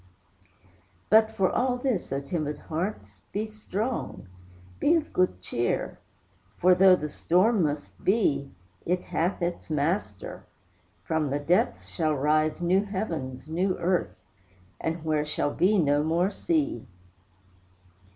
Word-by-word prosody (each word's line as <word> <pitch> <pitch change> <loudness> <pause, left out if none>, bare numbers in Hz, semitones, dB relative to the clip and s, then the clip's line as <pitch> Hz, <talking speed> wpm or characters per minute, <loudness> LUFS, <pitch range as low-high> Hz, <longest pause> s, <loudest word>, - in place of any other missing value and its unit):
But 220 0 +6
for 195 -4 +1
all 250 0 +1
this, 245 - -2
O 135 - 0
timid 150 0 -3
hearts, 175 +8 -5
be 210 +2 -1
strong; 215 - -4 0.5
Be 325 - +4
of 315 -2 -2
good 135 - +1
cheer, 120 +5 -2 0.6
for, 185 +1 +5
though 185 +1 +7
the 150 -4 -4
storm 185 +8 +2
must 150 -2 -3
be, 150 -10 +2 0.3
It 180 +1 0
hath 175 +2 -1
its 175 0 -3
Master: 165 - -2 0.6
from 160 -3 0
the 140 - 0
depths 165 +5 +1
shall 155 -3 0
rise 155 +4 +1
New 185 +3 +3
heavens, 165 -11 -4
new 180 +4 0
earth, 180 +1 0 0.9
where 155 -2 +1
shall 150 -1 -1
be 200 +4 +3
no 145 -4 +3
more 170 +5 +1
sea. 315 - -1
175 Hz, 125 wpm, -27 LUFS, 150-205 Hz, 0.9 s, though